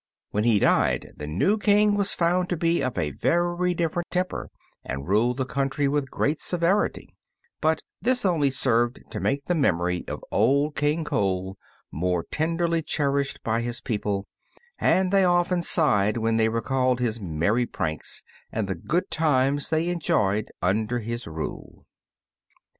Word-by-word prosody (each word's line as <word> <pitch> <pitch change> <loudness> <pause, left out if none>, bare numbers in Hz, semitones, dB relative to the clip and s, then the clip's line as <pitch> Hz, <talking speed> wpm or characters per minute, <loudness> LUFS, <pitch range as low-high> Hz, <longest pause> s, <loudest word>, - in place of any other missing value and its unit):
When 105 +2 0
he 115 -3 +4
died - - +2
the 75 - -6
new 185 - +1
King 210 0 +4
was 205 0 0
found 180 +1 +1
to 175 - -1
be 165 0 +1
of 130 -4 -2
a 75 - 0
very 175 - 0
different 170 +1 -2
temper, 185 0 -2 0.3
and 70 +3 -5
ruled 115 +6 +2
the 130 - -1
country 140 +1 -1
with 140 -1 0
great 150 +1 0
severity; 180 +4 0 0.5
but 160 0 +1 0.2
this 245 +2 +1
only 160 -7 +3
served 120 -2 +1
to - - -4
make 140 0 -1
the 180 - +1
memory 90 - +1
of - - -6
Old 140 +7 +2
King 150 +3 +1
Cole 95 -7 -1 0.4
more 90 +1 -1
tenderly 165 +1 0
cherished 140 -2 -1
by 115 +1 0
his 120 0 -3
people, 105 -4 -2 0.5
and 185 0 +2
they 195 -1 +5
often 175 0 +2
sighed 110 - +3
when 115 0 +1
they 110 0 +3
recalled 125 +2 0
his 115 -2 -1
merry 100 +8 0
pranks, 80 -6 -4 0.3
and 110 -3 -2
the 95 - -1
good 170 - -2
times 145 -2 +1
they 160 +1 +1
enjoyed 110 - 0
under 110 +6 +1
his 120 +1 -5
rule. 80 -1 -7
135 Hz, 155 wpm, -25 LUFS, 110-170 Hz, 0.5 s, they